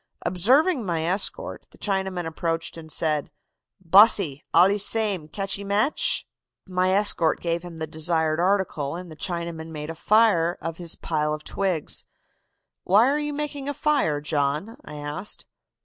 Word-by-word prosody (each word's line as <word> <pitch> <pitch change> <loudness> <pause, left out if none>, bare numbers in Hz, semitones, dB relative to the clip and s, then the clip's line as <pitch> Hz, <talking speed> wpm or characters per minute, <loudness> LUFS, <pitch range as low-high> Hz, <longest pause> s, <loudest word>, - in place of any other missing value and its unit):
Observing 255 - +3
my 170 -5 -1
escort, 195 - -2
the - - -20
Chinaman 190 -3 -2
approached 165 0 -3
and 160 -1 -10
said: 155 -2 -1 0.5
"'Bosse, 185 -5 +5
alle 195 +3 +5
same, 205 -6 -1
catchee 195 +4 -2
match?' 205 +8 +2 0.4
"My 185 0 +1
escort 190 -4 +2
gave 170 0 -2
him 175 -2 -10
the 160 - -3
desired 160 0 0
article, 175 -6 0
and 180 -1 -8
the - - -9
Chinaman 170 -1 -4
made 155 0 -6
a - - -6
fire 180 -2 +3
of 165 -1 -5
his 170 -2 -2
pile 150 -1 -1
of 155 - -11
twigs. 185 -6 -2 0.8
'Why 210 +6 +5
are 290 +2 +1
you 295 0 -2
making 285 -1 -4
a 285 - -3
fire, 275 - +1
John?' 150 +8 -1
I - - -10
asked. 150 +7 -4
175 Hz, 150 wpm, -24 LUFS, 160-205 Hz, 0.8 s, Bosse